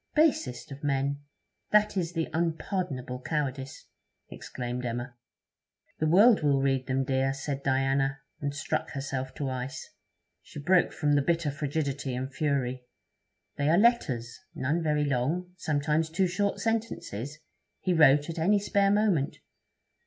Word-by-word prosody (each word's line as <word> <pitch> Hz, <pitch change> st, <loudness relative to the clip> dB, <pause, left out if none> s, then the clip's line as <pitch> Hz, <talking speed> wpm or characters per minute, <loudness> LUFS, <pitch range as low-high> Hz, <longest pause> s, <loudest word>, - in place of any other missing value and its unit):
'Basest 290 Hz, -, +1 dB
of 140 Hz, +2 st, -9 dB
men! 140 Hz, 0 st, 0 dB, 0.5 s
That 210 Hz, 0 st, +4 dB
is 175 Hz, -3 st, -1 dB
the 165 Hz, -2 st, -1 dB
unpardonable 160 Hz, -6 st, -2 dB
cowardice!', 135 Hz, -3 st, -3 dB, 0.5 s
exclaimed 125 Hz, 0 st, -5 dB
Emma. 120 Hz, +1 st, -4 dB, 0.8 s
'The 155 Hz, -, +1 dB
world 205 Hz, +7 st, +6 dB
will 140 Hz, -2 st, +3 dB
read 135 Hz, -1 st, 0 dB
them, 135 Hz, 0 st, +1 dB
dear,' 135 Hz, 0 st, 0 dB
said 140 Hz, 0 st, -4 dB
Diana, 135 Hz, +1 st, +1 dB, 0.2 s
and 145 Hz, 0 st, -2 dB
struck 155 Hz, +1 st, -2 dB
herself 135 Hz, -2 st, -4 dB
to 140 Hz, -, -3 dB
ice. 130 Hz, 0 st, -4 dB, 0.5 s
She -, -, -10 dB
broke 180 Hz, +5 st, +3 dB
from 150 Hz, -3 st, 0 dB
the 145 Hz, -, +4 dB
bitter 165 Hz, 0 st, 0 dB
frigidity 140 Hz, -2 st, -2 dB
in 130 Hz, +1 st, -3 dB
fury. 130 Hz, -3 st, -1 dB, 0.7 s
'They 140 Hz, +1 st, +1 dB
are 165 Hz, -, +5 dB
letters 135 Hz, -, +2 dB, 0.2 s
none 150 Hz, +6 st, 0 dB
very 150 Hz, -2 st, +1 dB
long 150 Hz, +7 st, -1 dB
sometimes 155 Hz, -1 st, 0 dB
two 185 Hz, +4 st, +1 dB
short 200 Hz, +3 st, 0 dB
sentences 185 Hz, -, -3 dB, 0.4 s
he 185 Hz, -, 0 dB
wrote 145 Hz, -3 st, +5 dB
at 165 Hz, -1 st, -5 dB
any 200 Hz, +6 st, +4 dB
spare 200 Hz, 0 st, +2 dB
moment. 200 Hz, -8 st, +2 dB
145 Hz, 140 wpm, -28 LUFS, 135-170 Hz, 0.8 s, world